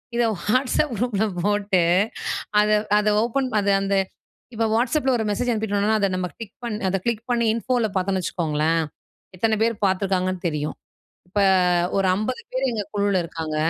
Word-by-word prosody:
இத 240 - +2 0.2
வாட்ஸ்அப் 255 +4 +1
குரூப்ல 220 -2 0 0.2
போட்டு 205 -2 +2 0.8
அத, 210 - +1 0.3
அத 210 - -1 0.2
ஓப்பன் 255 +3 -1
அது 200 0 +2
அந்த 195 0 0 0.6
இப்ப 225 +1 +1
வாட்ஸ்அப் 260 +5 +1
ல - - +5
ஒரு 225 - -1
மெசேஜ் 245 +4 -1
அனுப்பிடோன்னா, 215 -1 +1
அத 200 - +2
நம்ம 185 0 -1
டிக் 225 -2 -9
பண் 230 -3 -2
அத 195 - +1
கிளிக் 230 -2 -1
பண்ணி 235 -1 +2
இன்ஃபோ 240 +3 -1
ல - - +2
பாத்தோன்னு 190 0 0
வச்சுக்கோங்களேன்! 160 -1 0 0.5
எத்தன 220 +3 +1
பேர் 230 0 +1
பார்த்துருக்காங்கன்னு 185 -1 0
தெரியும். 150 -1 -3 0.5
இப்ப 205 +3 -1 0.6
ஒரு 195 - +2
50 250 +6 -3
பேர் 260 +1 0
எங்க 215 -3 -2
குழுவுல 200 -2 +2
இருக்காங்க 160 -2 -4
205 Hz, 160 wpm, -23 LUFS, 185-230 Hz, 0.8 s, ல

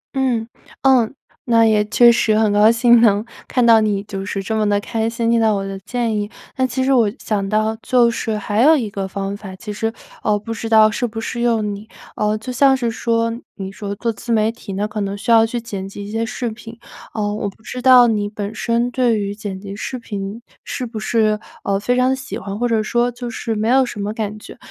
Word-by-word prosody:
嗯 250 -4 0 0.4
嗯， 260 -2 +4 0.3
那 230 -2 +4
也 215 -1 +3
确 235 +3 +6
实 220 -2 +2
很 215 -2 +2
高 210 +2 +6
兴 235 0 +5
能 210 -2 +3 0.2
看 250 -2 +1
到 225 -1 +6
你 205 -2 0
就 195 -2 -6
是 195 0 -4
这 220 +3 -2
么 215 -1 +1
地 205 0 +2
开 225 +2 -2
心 230 0 -1
听 230 -1 +3
到 220 -1 +3
我 195 - -2
的 195 0 -6
建 230 +2 -2
议。 205 0 -2 0.3
但 260 -1 +1
其 260 +1 -2
实 270 +1 +2
我 225 -5 +3
想 200 -3 -2
到 215 +1 +1
就 240 -1 +3
是 220 -2 -2
还 210 +2 -1
有 315 +4 +6
一 225 -6 -3
个 195 -1 -3
方 195 +1 -4
法， 200 -2 -9
其 210 +3 -7
实， 225 +2 -2 0.3
呃 210 -1 +2
不 225 +2 -6
知 225 0 -5
道 220 -1 +6
适 245 +3 -1
不 225 0 -6
适 235 +1 -4
用 225 -3 +1
你。 205 +2 -9 0.3
呃 210 0 0
就 240 +4 -6
像 270 +1 +4
是 240 -3 -1
说， 230 0 0 0.2
你 190 -1 -6
说 200 0 -6
做 230 +2 -1
自 235 +2 -6
媒 220 -1 +2
体 225 -3 -9
呢 205 +2 -1
可 210 0 -4
能 200 0 -3
需 220 - -2
要 225 -1 +6
去 240 +1 -3
剪 195 -4 -6
辑 200 +1 -8
一 205 - -8
些 225 +1 -1
视 240 +1 -3
频， 225 +1 -11 0.4
嗯 205 -1 -1
我 200 - -2
不 205 - -19
知 250 - -6
道 250 -1 +7
你 210 -2 0
本 205 0 -5
身 235 +1 0
对 245 -3 +2
于 200 0 -3
剪 205 -3 -6
辑 195 0 -8
视 255 +5 -5
频 205 0 -6 0.2
是 255 - -4
不 225 -2 -6
是 215 -1 +1 0.2
呃 195 0 0
非 245 +4 0
常 255 +1 +3
喜 260 0 -6
欢， 195 +1 -6
或 245 - +1
者 225 -2 +1
说 240 +3 +1
就 245 0 -6
是 225 0 -3
没 215 +1 -1
有 265 +2 +5
什 210 - -7
么 205 +1 -2
感 215 -1 -4
觉。 - - -12
220 Hz, 260 characters per minute, -19 LUFS, 205-235 Hz, 0.4 s, 道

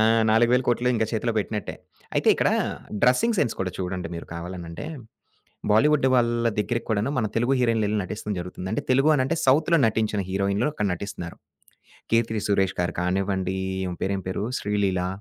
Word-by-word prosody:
ఆ! - - +5 0.3
40000000000 120 +2 +3
ఇంకా 110 -1 +1
చేతిలో 115 +1 0
పెట్టినట్టే. 105 0 -3 0.4
అయితే - - +2
ఇక్కడ - - +2 0.5
డ్రెసింగ్ 215 - +3
సెన్స్ 115 - +1
కూడా 95 - -1
చూడండి 90 -2 -3
మీరు 85 - -7
కావాలనంటే, 85 +3 -7 0.9
బాలీవుడ్ 140 +6 +4
వాళ్ళ 120 -1 +2
దగ్గరకి 115 +3 -1
కూడాను 110 +5 +1
మన 110 - +1
తెలుగు 120 +3 +2
హీరోయిన్‌లెళ్లి 110 -3 +1
నటిస్తం 105 +2 -5
జరుగుతుంది. 90 +1 -6
అంటే - - -1
తెలుగు 135 +4 +4
వాళ్ళంటే 145 +3 +1
సౌత్‌లో 160 +5 +4
నటించిన 110 -1 0
హీరోయిన్లు 100 +6 +1
అక్కడ 105 -8 -1
నటిస్తున్నారు. 90 -3 -7 0.8
'కీర్తి 115 -2 +1
సురేష్' 95 -2 +1
గారు 90 - -1
కానివ్వండి 95 +1 -1 0.3
ఈమె 90 - -4
పేరేం 95 0 -1
పేరు 95 - -2
'శ్రీలీల'. 100 -3 0
105 Hz, 150 wpm, -25 LUFS, 95-120 Hz, 0.9 s, ఆ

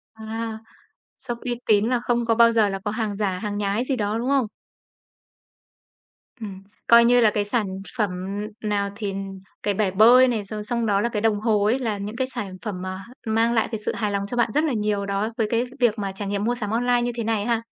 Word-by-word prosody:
À, 220 0 -5 0.6
shop 240 -1 -5
uy 240 -1 -3
tín 210 -1 +4
là 245 +1 +1
không 240 0 0
có 230 -1 +2
bao 230 0 +6
giờ 220 -3 +3
là 195 0 -3
có 205 - 0
hàng 215 -2 -2
giả, 195 -3 -1
hàng 205 0 -3
nhái 205 +3 0
gì 270 - 0
đó, 210 -2 -1
đúng 240 +3 -2
không? 275 -5 +2 1.9
Ừm, 195 -3 -7 0.2
coi 235 0 +8
như 245 +1 +5
là 220 -2 +5
cái 205 -1 0
sản 210 0 0 0.3
phẩm 210 -3 +1 0.5
n 215 - -1
nào 200 -1 0
thì 205 -2 -3 0.5
cái 205 - +1
bể 200 -1 0
bơi 235 +6 +7
này, 230 -4 -1
rồi 210 +1 -6
xong 235 +2 -1
đó 200 -2 +2
là 235 - 0
cái 215 -3 -2
đồng 215 -2 +2
hồ 215 -2 +2
ấy 235 +5 +2
là 225 -5 -1
những 205 +2 -5
cái 260 +1 -1
sản 210 -8 -6
phẩm 200 -5 -5
mà 185 0 -4
h 195 +5 -12 0.2
mang 225 +2 +2
lại 225 - +2
cái 220 - -3
sự - - 0
hài 210 -2 -1
lòng 200 0 -1
cho 245 - -4
bạn 235 -2 +2
rất 300 - +2
là 310 -4 0
nhiều 210 -2 0
đó, 200 +2 -1
với 225 -3 +1
cái 235 +2 +1
việc 235 -3 +2
mà 200 -1 -2
trải 195 +1 -5
nghiệm 200 0 -1
mua 240 +3 +1
sắm 210 -4 -4
online 245 +1 +2
như 240 0 -1
thế 235 - -2
này 220 -2 0
ha. 230 -1 +1
220 Hz, 245 wpm, -23 LUFS, 205-235 Hz, 1.9 s, coi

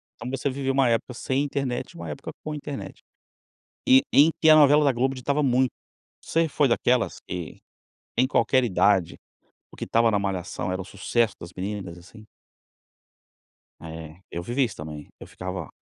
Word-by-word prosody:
Então 120 +2 -7
você 135 +1 -2
viveu 135 0 -2
uma 135 -3 +3
época 115 +2 -1
sem 130 +3 -1
internet 135 -3 -3
e - - -19
uma 85 -2 -7
época 75 - -7
com 155 - -4
internet 145 -2 -7 0.9
e 130 +1 +7
em 150 +4 +7
que 160 - +6
a 155 - +9
novela 150 0 +6
da 140 - +4
Globo 130 +2 0
ditava 140 +4 -1
muito. 130 -1 +3 0.5
Você 165 0 +1
foi 145 -1 +2
daquelas, 120 0 +1
que 90 -3 -6 0.6
em 130 +2 +4
qualquer 130 0 +2
idade, 95 -4 +2 0.5
o - - -14
que - - -6
estava 115 0 +3
na 100 - +2
malhação 90 -2 -3
era 95 +1 -2
o - - -9
sucesso 110 +4 0
das 85 +1 -9
meninas, 95 -2 -5
assim? 105 +5 -15 1.6
É, 80 0 -9
eu 85 - -5
vivi 125 +8 0
isso 115 - -4
também, 75 -1 -8
eu - - -9
ficava 90 -3 -6
120 Hz, 175 wpm, -25 LUFS, 90-135 Hz, 1.6 s, a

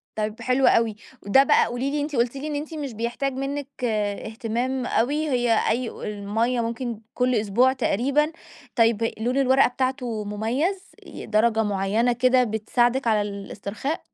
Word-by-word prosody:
طيب 215 0 -3
حلو 255 +1 +2
أوي. 225 -2 +3 0.3
وده 235 +7 +5
بقى - - +4
قولي 245 +4 -2
لي، 295 +1 -1
أنتِ 290 -1 -3
قلتِ 235 +2 +1
لي 275 +2 -5
إن 305 - -3
أنتِ 300 +2 -5
مش 290 -4 -4
بيحتاج 240 +5 -2
منِّك 275 +1 -4 0.6
إهتمام 245 +3 -2
أوي، 295 +8 0
هي 245 -4 +2
أي 235 +1 0
و - - -11
المَيَّة 210 +4 -1
ممكن 230 0 -3
كُل 250 0 +1
أسبوع 225 +4 +3
تقريبًا، 270 +5 +1 0.4
طيب 230 -1 +2
لون 245 +4 0
الورقة 265 0 +4
بتاعته 250 -3 -2
مميّز، 250 - -2 0.2
ي - - -9
درجة 220 +1 +2
معيّنة 205 +4 +1
كده 250 +1 +3
بتساعدِك 240 +3 0
على 215 -2 +3
الاسترخاء؟ 200 +7 -5
240 Hz, 155 wpm, -24 LUFS, 220-265 Hz, 0.6 s, وده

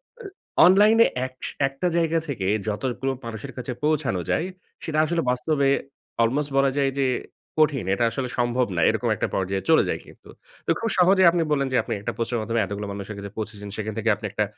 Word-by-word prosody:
অ্যা 485 -2 -17 0.4
অনলাইনে 210 +5 +6 0.2
একশ 130 0 -7 0.2
একটা 135 +6 -3
জায়গা 165 -1 +2
থেকে 115 -10 -3 0.2
যতগুলো 130 +5 -2
মানুষের 115 +4 -6
কাছে 125 0 -4
পৌঁছানো 150 - +1
যায় 170 - +1 0.4
সেটা 155 -1 -3
আসলে 165 +1 0
বাস্তবে 140 +2 +1 0.6
almost 145 +5 0
বলা 135 0 +4
যায় 135 -1 +2
যে 135 - +3 0.5
কঠিন। 145 -9 +3
এটা 100 - 0
আসলে 125 +2 -3
সম্ভব 120 +1 +1
না। 85 - +1
এরকম - - 0
একটা - - -1
পর্যায়ে 95 0 -1
চলে 160 - +6
যায় - - -1
কিন্তু। - - -17 0.4
তো - - -6
খুব 225 - -1
সহজেই 185 0 +6
আপনি 175 - 0
বললেন, 140 -2 +1
যে - - +4
আপনি - - -3
একটা 120 - -3
পোস্টারের 115 0 -1
মাধ্যমে 115 +1 0
এতগুলো 100 +1 -5
মানুষের 100 +1 -6
কাছে 100 0 -6
পৌঁছেছেন 105 -1 -6
সেখান 110 0 -3
থেকে 115 0 0
আপনি 110 - -8
একটা 105 - 0
130 Hz, 195 wpm, -24 LUFS, 110-155 Hz, 0.6 s, অনলাইনে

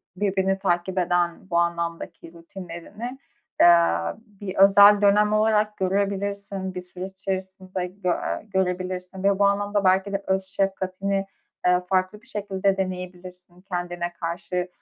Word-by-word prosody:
birbirini 195 0 0
takip 185 0 -1
eden 175 0 0
bu 170 - +1
anlamdaki 170 -1 -2
rutinlerini, 180 +8 -8 0.4
eee, 170 -1 +7 0.3
bir 205 -4 -9
özel 200 +1 +7
dönem 210 +1 +4
olarak 215 0 +2
görebilirsin, 200 0 -2
bir 180 - -4
süreç 180 +1 -8
içerisinde 190 -1 -4
gö 185 0 -4
eee, - - -3
görebilirsin 185 0 -2
ve 200 0 +2
bu 200 - +5
anlamda 205 0 +1
belki 190 +2 +2
de 200 0 -2
öz 190 0 +1
şefkatini, 195 0 -1 0.4
eee, 180 0 +4
farklı 190 +2 0
bir 255 - -24
şekilde 195 -4 -1
deneyebilirsin 180 -1 -6
kendine 175 -2 -4
karşı. 180 +2 -3
190 Hz, 130 wpm, -24 LUFS, 180-200 Hz, 0.4 s, eee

